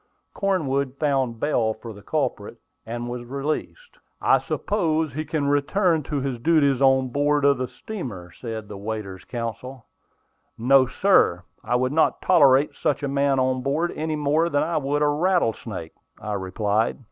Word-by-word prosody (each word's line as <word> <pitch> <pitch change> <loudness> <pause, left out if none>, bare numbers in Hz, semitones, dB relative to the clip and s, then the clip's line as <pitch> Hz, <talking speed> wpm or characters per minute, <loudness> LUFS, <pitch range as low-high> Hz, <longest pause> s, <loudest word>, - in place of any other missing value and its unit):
Cornwood 140 -9 -1
found 135 -6 0
bail 115 -7 +1
for 115 0 -9
the 100 - -13
culprit, - - -3 0.3
and 120 +1 -4
he 120 - -5
was 120 0 -5
released. 155 - -5 0.2
"I - - +4
suppose 160 -7 -1
he 155 +3 -3
can 150 -1 -2
return 160 +4 +2
to 145 -3 -2
his 130 -3 -3
duties 140 -1 +3
on 130 -1 +4
board 145 +2 +1
of 140 -2 +4
the 130 - -1
steamer," 120 - -7
said 110 -1 -7
the 100 -1 -8
waiter's 100 -3 -5
counsel. 120 +1 -6 0.7
"No, 130 +3 +4
sir; 125 - +3 0.2
I 120 +3 0
would 130 +2 0
not 160 - +2
tolerate 145 -5 +4
such 145 - -1
a - - 0
man 140 0 +1
on 130 0 +1
board 150 +6 0
any 155 0 -2
more 150 +3 +1
than 145 -2 +1
I 165 +1 -1
would 145 +1 0
a - - +3
rattlesnake," 145 - -1 0.3
I 105 -1 -4
replied. 105 +3 -1
135 Hz, 165 wpm, -24 LUFS, 120-155 Hz, 0.7 s, I